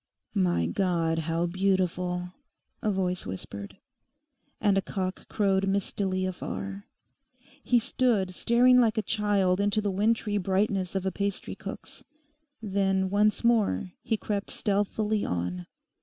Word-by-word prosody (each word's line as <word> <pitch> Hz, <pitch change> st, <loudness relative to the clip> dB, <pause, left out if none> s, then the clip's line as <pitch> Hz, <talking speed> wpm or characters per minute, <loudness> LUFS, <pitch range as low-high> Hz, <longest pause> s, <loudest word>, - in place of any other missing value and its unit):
'My 85 Hz, -2 st, +2 dB
God, 165 Hz, -, 0 dB
how 165 Hz, +1 st, +1 dB
beautiful!' 180 Hz, -1 st, 0 dB, 0.5 s
a 215 Hz, -, 0 dB
voice 185 Hz, -2 st, -1 dB
whispered. 100 Hz, -, -7 dB, 0.8 s
And 205 Hz, -2 st, +3 dB
a 195 Hz, -, +3 dB
cock 185 Hz, 0 st, -4 dB
crowed 195 Hz, -2 st, +1 dB
mistily 195 Hz, -1 st, 0 dB
afar. 195 Hz, +2 st, -5 dB, 0.8 s
He 245 Hz, -, +3 dB
stood 225 Hz, -5 st, +1 dB
staring 250 Hz, +5 st, +5 dB
like 225 Hz, -3 st, +3 dB
a 220 Hz, -, +1 dB
child 200 Hz, -3 st, +1 dB
into 205 Hz, +1 st, +2 dB
the 205 Hz, -1 st, 0 dB
wintry 210 Hz, +1 st, +1 dB
brightness 190 Hz, 0 st, 0 dB
of 190 Hz, -1 st, -1 dB
a 190 Hz, -, +1 dB
pastry 200 Hz, 0 st, -3 dB
cook's. -, -, -9 dB, 0.6 s
Then 195 Hz, -2 st, +1 dB
once 210 Hz, +2 st, +2 dB
more 215 Hz, -, +2 dB
he 225 Hz, -, -1 dB
crept 205 Hz, -1 st, -3 dB
stealthily 205 Hz, +1 st, 0 dB
on. 90 Hz, 0 st, -3 dB
195 Hz, 125 wpm, -28 LUFS, 180-210 Hz, 0.8 s, staring